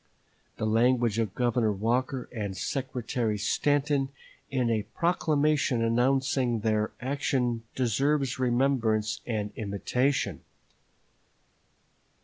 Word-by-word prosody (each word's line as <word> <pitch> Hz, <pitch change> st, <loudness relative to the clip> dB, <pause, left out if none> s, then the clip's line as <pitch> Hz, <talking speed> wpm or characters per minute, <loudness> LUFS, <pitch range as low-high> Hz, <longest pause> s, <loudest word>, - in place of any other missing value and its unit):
The -, -, -2 dB
language 115 Hz, 0 st, +2 dB
of 110 Hz, -4 st, -1 dB
Governor 120 Hz, -3 st, +1 dB
Walker 120 Hz, +5 st, -1 dB
and 100 Hz, -5 st, -4 dB
Secretary 125 Hz, -3 st, -2 dB
Stanton 140 Hz, +6 st, +1 dB, 0.4 s
in 130 Hz, -3 st, 0 dB
a 110 Hz, -2 st, +1 dB, 0.2 s
proclamation 150 Hz, -7 st, +2 dB
announcing 125 Hz, 0 st, +1 dB
their 110 Hz, -1 st, +1 dB
action 125 Hz, -3 st, 0 dB
deserves 135 Hz, +2 st, +1 dB
remembrance 120 Hz, -4 st, +1 dB
and 105 Hz, -3 st, -2 dB
imitation. 120 Hz, +6 st, -1 dB
120 Hz, 90 wpm, -28 LUFS, 110-135 Hz, 0.4 s, language